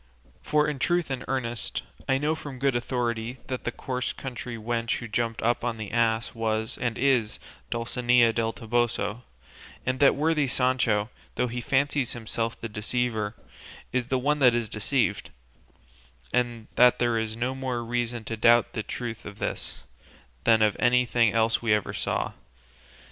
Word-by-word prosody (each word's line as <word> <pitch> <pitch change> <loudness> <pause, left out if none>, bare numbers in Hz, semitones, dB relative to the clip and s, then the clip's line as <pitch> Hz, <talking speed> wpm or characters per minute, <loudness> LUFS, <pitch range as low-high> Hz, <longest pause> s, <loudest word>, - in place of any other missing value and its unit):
For 150 0 +2
in 150 -2 -2
truth 175 -2 +1
and 130 -2 -3
earnest, 120 -4 -3 0.3
I 135 - +4
know 150 +3 +1
from 145 -4 -7
good 135 0 +1
authority 120 -1 -1
that 130 -1 -5
the 120 - 0
coarse 125 +1 -3
country 125 -2 -6
wench 115 +1 -1
who 120 - -6
jumped 115 +1 -1
up 120 +1 +1
on 120 -2 -1
the 110 -2 -6
ass 115 0 +1
was 110 -1 -1
and 120 -2 -1
is 125 -5 +2 0.3
Dulcinea 120 0 +3
del 115 0 0
Toboso, 115 -1 -1 0.6
and 130 0 0
that 140 - +6
worthy 150 -1 +2
Sancho, 125 -4 +1 0.2
though 125 - +1
he 120 +1 -3
fancies 140 0 +1
himself 115 0 -3
the 115 - -4
deceiver, 110 0 -1 0.6
is 125 -1 0
the 130 - +1
one 145 +4 +1
that 125 -4 +6
is 115 -2 -1
deceived; 105 0 0 1.0
and 120 -2 0
that 125 0 +6
there 120 -2 +2
is 110 0 -3
no 125 +2 -1
more 130 -3 -3
reason 120 0 -2
to 115 - -3
doubt 120 +2 +4
the 110 - -2
truth 115 +1 -5
of 100 - -9
this, - - -4 0.6
than 110 -1 +5
of 105 -1 +3
anything 120 -2 +4
else 115 0 +2
we 115 - -2
never 105 -2 +2
saw. - - -1
120 Hz, 165 wpm, -27 LUFS, 115-130 Hz, 1.0 s, that